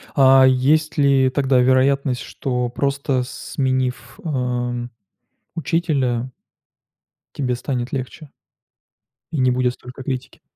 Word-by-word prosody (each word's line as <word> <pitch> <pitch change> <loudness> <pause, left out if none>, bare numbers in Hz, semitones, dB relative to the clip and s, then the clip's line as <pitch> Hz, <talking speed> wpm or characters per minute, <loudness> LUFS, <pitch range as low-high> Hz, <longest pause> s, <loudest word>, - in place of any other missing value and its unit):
А, 135 -1 +7
есть 150 +5 +2
ли 135 -2 +4
тогда 130 -1 +2
вероятность, 130 +1 +2
что 125 -2 -3
просто 140 0 -1
сменив, 130 -1 -3
эм, 125 -4 -2 0.7
учителя 140 -8 0 1.1
тебе 125 -3 -1
станет 125 0 -3
легче? 135 +3 -6 1.0
И 155 - -2
не 130 -1 +3
будет 125 0 +1
столько 125 +2 -11
критики. 130 -1 -5
130 Hz, 100 wpm, -21 LUFS, 125-140 Hz, 1.1 s, А